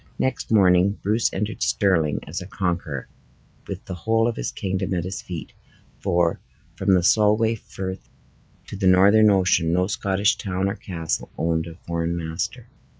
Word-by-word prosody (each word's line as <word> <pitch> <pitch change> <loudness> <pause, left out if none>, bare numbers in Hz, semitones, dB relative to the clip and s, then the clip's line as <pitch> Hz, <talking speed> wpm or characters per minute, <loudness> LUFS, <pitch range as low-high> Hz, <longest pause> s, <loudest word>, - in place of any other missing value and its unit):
Next 130 -2 -2
morning 95 -1 +4
Bruce 110 +4 +1
entered 105 +3 -3
Stirling 85 -7 +1
as 85 +5 -5
a 90 - -8
conqueror, 85 -8 -3 0.6
with - - -6
the - - -6
whole 115 +6 +1
of 120 - -1
his - - -3
kingdom 95 0 -2
at 85 - -1
his 90 +2 -5
feet; 85 -4 -7 0.5
for, 85 -3 +1 0.4
from 95 0 +2
the 90 - +2
Solway 110 +3 +4
Frith 95 -3 -7 0.6
to - - -8
the 95 -1 0
Northern 100 +4 +6
Ocean, 90 -4 +3
no 90 +2 +2
Scottish 100 +1 +1
town 95 -1 -1
or 100 - -2
castle 85 -4 -4
owned 80 0 0
a 85 - -9
foreign 85 0 -2
master. 90 +9 -4
95 Hz, 160 wpm, -23 LUFS, 85-105 Hz, 0.6 s, Northern